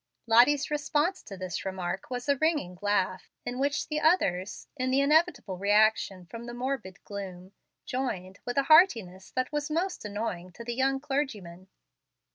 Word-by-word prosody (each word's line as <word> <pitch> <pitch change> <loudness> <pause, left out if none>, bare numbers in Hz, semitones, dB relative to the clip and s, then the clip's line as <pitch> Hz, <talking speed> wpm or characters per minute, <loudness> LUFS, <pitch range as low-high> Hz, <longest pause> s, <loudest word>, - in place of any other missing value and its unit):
Lottie's 250 +6 +5
response 300 +5 0
to 195 - -10
this 185 -2 -4
remark 190 0 -4
was 250 +1 -4
a 280 - +4
ringing 300 - 0
laugh, 190 -3 0 0.2
in 245 +1 -4
which 285 +2 0
the 305 0 -1
others, 205 - +1
in 255 -2 -1
the 265 +1 +3
inevitable 280 - +2
reaction 205 -2 +2
from 230 +7 -9
the 240 - -6
morbid 245 -7 -4
gloom, 190 -2 -7 0.3
joined 200 -8 -3
with 245 +1 -4
a 275 - +4
heartiness 230 - +4
that 255 +1 -2
was 295 0 -2
most 355 +4 -1
annoying 205 -4 -4
to 235 - -9
the 240 +1 -3
young 270 +2 +1
clergyman. 225 -11 -3
240 Hz, 160 wpm, -28 LUFS, 190-285 Hz, 0.3 s, Lottie's